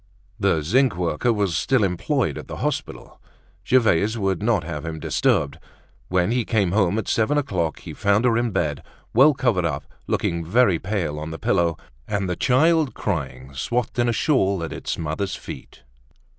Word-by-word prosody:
The 95 -7 +2
zinc 125 - +2
worker 90 +7 0
was 100 -6 0
still 130 -4 +2
employed 95 - 0
at - - -8
the - - -6
hospital. - - -4 0.4
Gervaise 110 -2 +3
would 95 -3 -1
not 105 -5 +1
have 75 -2 -5
him 80 -1 -5
disturbed. 70 -1 0 0.5
When 90 +3 +1
he 120 0 +1
came 105 -6 +1
home 100 0 +2
at 110 - -2
seven 115 +7 +1
o'clock, 90 - -1
he - - -8
found 100 +4 +2
her 120 -2 +3
in 120 +1 +1
bed, 80 -8 -1 0.3
well 135 +5 +6
covered 120 -10 +1
up, 75 -5 -2 0.2
looking 85 0 -1
very 95 0 +3
pale 90 -7 -2
on 75 +1 -5
the 80 - -6
pillow, 85 0 +1 0.3
and 100 -2 -1
the 90 - -1
child 155 - +2
crying, 70 - -4
swathed 120 - -2
in 120 0 +3
a - - +3
shawl 100 - +1
at 80 - -4
its - - -4
mother's 85 +5 -3
feet. - - -10
100 Hz, 175 wpm, -23 LUFS, 85-120 Hz, 0.5 s, well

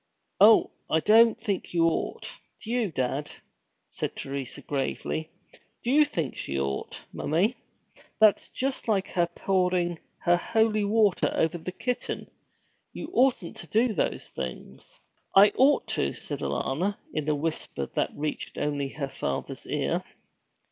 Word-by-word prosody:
'Oh, 215 +3 +7 0.2
I 160 - +3
don't 225 +5 +5
think 205 -5 -3
you 165 -1 +4
ought, 165 - -1 0.3
do 225 - -7
you, 235 -6 0
dad?' 135 +1 -2 0.6
said - - -4
Teresa 135 0 -4
gravely. 145 +3 -2 0.5
'Do 240 - 0
you 300 +2 +6
think 165 - -3
she 70 0 -3
ought, 70 0 -3
mommie? 190 +11 +1 0.6
That's 215 -2 +5
just 265 -1 -3
like 200 -4 +1
her 175 -1 +1
pouring 180 -1 0 0.2
her 175 0 +4
holy 220 +2 +2
water 210 -2 +3
over 165 +2 +1
the 185 - -5
kitten. 250 +6 -3 0.6
You 315 - -7
oughtn't 250 -9 +2
to 175 - -9
do 225 +4 +2
those 170 - -1
things.' 65 -2 -7 0.4
'I 200 +2 +9
ought 275 +3 +4
to,' - - -1
said - - -6
Alanna, 185 +9 -1 0.2
in 155 -1 -1
a 150 - +2
whisper 145 - -2
that - - +1
reached 150 +1 -4
only 145 -2 -1
her 140 -2 -3
father's 70 - -4
ear. - - -1
175 Hz, 140 wpm, -27 LUFS, 150-220 Hz, 0.6 s, I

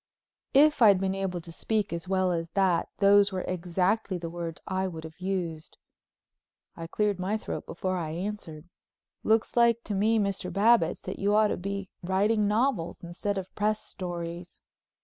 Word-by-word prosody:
If 295 0 +5
I'd 200 -4 +7
been 190 0 0
able 190 -2 -3
to 165 - -11
speak 210 +3 -1
as 170 +1 -5
well 185 -1 +1
as 165 -1 -2
that 185 -4 +2
those 200 0 +5
were 185 -1 -3
exactly 185 +3 -1
the 165 -1 -6
words 170 -1 -5
I 190 0 -1
would 165 -3 -7
have 160 +1 -11
used. 180 -4 -4 1.0
I 165 - -7
cleared 205 +1 0
my 195 +4 0
throat - - -6
before 185 -1 -2
I 165 -3 -3
answered. 170 -2 -6 0.5
"Looks 220 0 +1
like 235 -1 +4
to 210 - -4
me, 215 +3 +2
Mr. 200 -3 -1
Babbitts, 205 -2 +3
that - - -6
you 205 +1 +2
ought 215 0 +4
to - - 0
be 200 +1 -5
writing 205 +4 +2
novels 210 -6 0
instead 190 +4 -3
of 190 -1 -6
press 215 +1 -1
stories." 175 -1 -6
190 Hz, 170 wpm, -28 LUFS, 175-210 Hz, 1.0 s, I'd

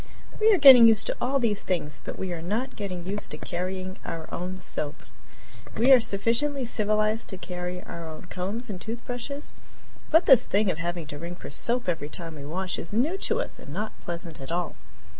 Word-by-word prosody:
We 440 +1 +6
are 405 - +5
getting 260 -6 +10
used 220 -1 +4
to - - -1
all 270 +3 +1
these 225 -6 +1
things, 150 -5 -3
but - - -6
we 185 -2 -3
are 165 - -5
not 215 +9 -2
getting 185 -4 -5
used 205 +2 -4
to - - -5
carrying 185 +1 -4
our 165 -1 -5
own 180 +2 -4
soap. 155 -5 -3 0.7
We 245 +5 +5
are 260 - +10
sufficiently 235 +6 +1
civilized 215 0 0
to 190 - -6
carry 180 0 -5
our 165 -1 -7
own 155 - -9
combs 195 +6 -5
and 190 -5 -6
toothbrushes, 245 +5 -5 0.6
but 325 +3 +5
this 265 -5 +7
thing 200 -1 +2
of 160 - -6
having 170 -1 -3
to 145 0 -8
ring 170 +2 -6
for 175 - -9
soap 240 - +1
every 165 -4 -2
time 165 0 -6
we 145 -2 -9
wash 185 +5 -3
is 165 - -6
new 255 - +1
to 455 +4 0
us - - -6
and - - -10
not 215 +1 -3
pleasant 170 -3 -6
at 135 - -7
all. 175 0 -2
190 Hz, 205 wpm, -26 LUFS, 175-235 Hz, 0.7 s, getting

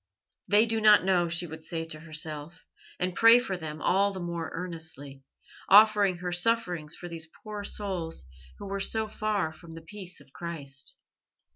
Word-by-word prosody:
"They 210 +2 +5
do 225 -1 -1
not 215 -2 +7
know," 175 -3 +2
she 170 +1 0
would 160 -1 -9
say 165 -1 -4
to 155 -1 -7
herself, 155 0 -5 0.3
and 180 0 0
pray 230 +5 +8
for 220 -6 -2
them 155 -3 -6
all 200 +2 +3
the 190 - -6
more 170 -2 -4
earnestly, 160 -6 -7 0.5
offering 205 -2 +6
her 180 0 -4
sufferings 175 -5 0
for 175 - -8
these 165 -2 -6
poor 210 -1 -6
souls 185 - -4 0.3
who - - -8
were 200 0 -3
so 220 +2 0
far 210 -6 -1
from 165 +1 -13
the 165 0 -10
peace 185 +1 -7
of 135 - -19
Christ. 140 -6 -6
175 Hz, 170 wpm, -28 LUFS, 160-205 Hz, 0.5 s, pray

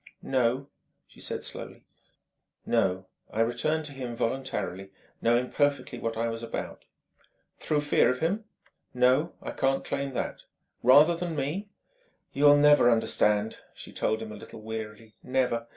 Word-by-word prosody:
"No," 130 +1 +1 0.4
she - - -20
said - - -5
slowly.... - - -8 0.8
"No: 95 0 +1 0.3
I 110 - 0
returned 135 +7 0
to 145 - -5
him 125 -3 -6
voluntarily, 115 -6 -3 0.3
knowing 120 +2 +2
perfectly 145 -4 0
what 115 0 -3
I 115 +1 0
was 115 0 -4
about." 115 - -6 0.7
"Through 150 -1 0
fear 145 - +3
of 125 - 0
him 195 +9 -1 0.3
?" - - -51
"No. 130 +6 +3
I - - -4
can't 135 0 0
claim 140 -1 -3
that." - - -4 0.4
"Rather 145 +7 +7
than 170 -1 -4
me 155 +9 -3 0.3
?" - - -41
"You'll 145 +1 +6
never 145 -4 +6
understand," 110 -2 +1 0.2
she - - -10
told 110 +1 -1
him 110 - -8
a - - -7
little 105 - -11
wearily 110 0 -7
"never. 125 -3 0
125 Hz, 150 wpm, -28 LUFS, 115-145 Hz, 0.8 s, Rather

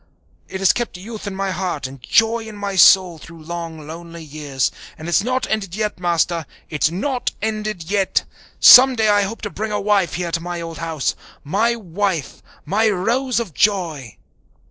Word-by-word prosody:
It 190 - -6
has 195 - +5
kept 240 -6 -4
youth 215 +3 -8
in 200 - -4
my 195 0 -2
heart 180 -5 -3
and 130 0 -8
joy 225 - +2
in 215 -1 -9
my 200 -1 -4
soul 185 -2 +6
through 165 +1 -13
long, 165 -2 -6
lonely 165 +1 -9
years. 145 -3 -2 0.3
And 155 - -8
it's 175 - +3
not 255 +2 -1
ended 195 -5 -2
yet, 210 -3 -2
Master 170 -2 0 0.2
it's 155 0 +1
not 245 - -2
ended 215 -4 -3
yet! 200 -2 +1 0.4
Some 260 +1 +9
day 220 -2 +2
I 205 0 +4
hope 205 +4 -4
to 205 - -4
bring 215 +1 -4
a 210 - -1
wife 200 -3 +1
here 175 -1 -3
to 165 - -1
my 175 0 -5
old 165 -1 -7
house 160 -4 -1 0.3
my 215 +10 +1
wife, 190 - -3 0.2
my 215 +7 +2
rose 235 +6 0
of 220 -9 -5
joy!" 165 - 0
190 Hz, 185 wpm, -20 LUFS, 165-215 Hz, 0.4 s, Some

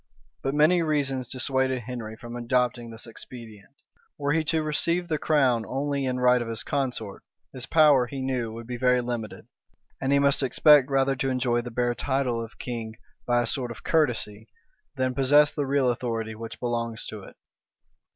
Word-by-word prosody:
But 135 +1 -2
many 160 +4 +4
reasons 140 -5 -1
dissuaded 130 0 0
Henry 115 -2 -6
from 120 +2 -9
adopting 120 0 0
this 115 0 -7
expedient. 115 0 -11 0.4
Were 145 0 -1
he 160 +1 +2
to 160 0 +1
receive 170 +3 +1
the 155 -3 -1
crown 130 -7 +2
only 140 +2 -2
in 125 -1 -1
right 125 0 +4
of 120 - -4
his 115 -1 -3
consort, 125 -8 -3 0.3
his 130 -1 -3
power, 145 -6 +5
he 135 +2 -6
knew, 130 -4 -2
would 115 +1 -8
be 120 +1 -5
very 125 0 +3
limited; 120 -3 -5 0.6
and 135 0 0
he 140 - +5
must 140 0 +3
expect 140 +1 +5
rather 135 0 +2
to 135 +1 -1
enjoy 125 -2 0
the 120 - -7
bare 120 +1 0
title 125 -3 -1
of 115 - -11
king 115 -3 -5 0.3
by 120 0 +3
a - - -2
sort 125 +1 -2
of 120 - -9
courtesy, 115 -8 0 0.5
than 130 -1 0
possess 145 +3 +4
the 145 -2 -2
real 135 -2 +2
authority 115 -2 -3
which 110 +1 -8
belongs 115 -2 -2
to 110 - -7
it. - - -13
125 Hz, 180 wpm, -26 LUFS, 120-140 Hz, 0.6 s, power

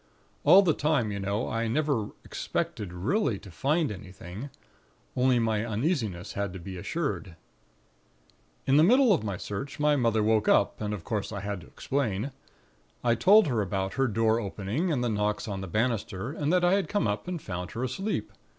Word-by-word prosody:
All 195 +2 +8
the 165 -5 +3
time, 145 -9 +1
you 100 - -3
know, 100 +3 -1
I 115 +1 -1
never 135 -3 0 0.2
expected 100 -5 -3
really 110 - 0
to 95 - -12
find 150 - +1
anything; 95 +4 -8 0.7
only 125 0 +3
my 110 -2 +1
uneasiness 110 - -2
had 100 -2 -2
to 95 - -7
be 95 +2 -7
assured. 110 - -3 1.3
"In 135 +1 +4
the 155 - +7
middle 245 +4 +6
of 170 - 0
my 100 -4 -3
search 105 +12 -5
my 150 0 +4
mother 115 -5 +2
woke 110 0 +2
up, 100 - +3
and 105 -1 -2
of 90 - -9
course 105 +1 -3
I 100 -2 -4
had 100 -2 -4
to - - -14
explain. 130 -2 -2 0.7
I 120 -1 +4
told 200 - +6
her 120 -7 0
about 95 -1 -2
her 135 -1 +2
door 110 0 +2
opening, 110 - -2
and 130 -5 0
the - - +1
knocks 105 -1 -1
on 100 -2 -4
the 95 - -5
banister, 110 +1 -1
and 150 0 -1
that 180 0 +3
I 175 - +4
had 200 -1 +1
come 205 - +1
up 105 +9 -2
and 180 -2 -3
found 90 -8 -5
her 120 - -3
asleep. 190 - -3
115 Hz, 190 wpm, -28 LUFS, 100-145 Hz, 1.3 s, All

